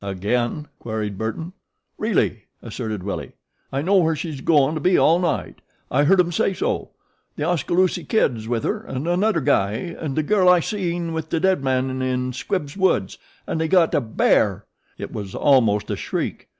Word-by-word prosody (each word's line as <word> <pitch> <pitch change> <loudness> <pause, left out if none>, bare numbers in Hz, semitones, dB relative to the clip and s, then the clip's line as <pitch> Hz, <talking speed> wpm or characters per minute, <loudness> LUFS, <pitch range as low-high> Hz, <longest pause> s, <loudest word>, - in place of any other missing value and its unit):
"Again?" 120 - -2
queried 110 -3 -4
Burton. 160 +11 -4 0.5
"Really," 200 - 0 0.2
asserted 110 -4 -5
Willie. 100 - -5 0.4
"I 135 +1 -1
know 195 +4 +3
where 165 -3 +3
she's 150 -3 -5
goin' 150 -2 +3
to 155 - -3
be 180 +3 +3
all 165 +2 +4
night. 175 -3 -2 0.3
I 145 +3 +3
heard 190 +5 +4
'em 175 -1 +3
say 190 +3 0
so. - - -2 0.5
The - - -3
Oskaloosie 175 +2 +1
Kid's 120 - 0
with 115 -1 -1
her 215 0 -2
an' 135 +3 -4
annuder 175 -2 +1
guy 100 +1 +2
an' 155 +1 -5
the 155 - +1
girl 185 +2 +3
I 180 -1 +6
seen 170 -3 -2
with 160 -1 -4
the 165 - 0
dead 190 -4 +2
man 130 0 0
in 130 0 -1
Squibbs' 145 0 -3
woods 190 - +1 0.3
an' - - -3
they 160 - 0
got 170 -1 +3
a - - +3
BEAR!" 110 -3 +1 0.3
It - - -7
was 100 -3 -6
almost 115 -7 +3
a - - 0
shriek. - - -4
150 Hz, 180 wpm, -22 LUFS, 120-175 Hz, 0.5 s, I